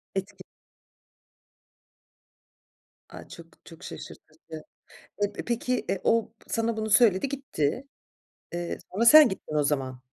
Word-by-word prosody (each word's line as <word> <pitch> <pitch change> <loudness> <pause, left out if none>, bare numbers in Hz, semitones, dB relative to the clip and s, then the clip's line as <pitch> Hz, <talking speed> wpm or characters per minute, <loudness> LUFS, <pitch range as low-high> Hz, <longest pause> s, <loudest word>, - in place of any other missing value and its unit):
Etki 195 +1 -5 2.7
A, - - -11
çok - - -15
çok - - -14
şaşırtıcı. 160 - -11 0.6
Eee, 205 0 0
p - - -6
peki, 245 +1 -2
eee, 195 -1 -1
o 230 -1 +1 0.2
sana 225 0 -1
bunu 220 0 -3
söyledi 210 +2 +4
gitti. 270 - -3 0.7
Eee, 175 0 -4
sonra 220 +5 0
sen 305 +2 +9
gittin 175 -5 -7
o 150 - +2
zaman. 135 -3 -2
205 Hz, 120 wpm, -26 LUFS, 175-235 Hz, 2.7 s, sen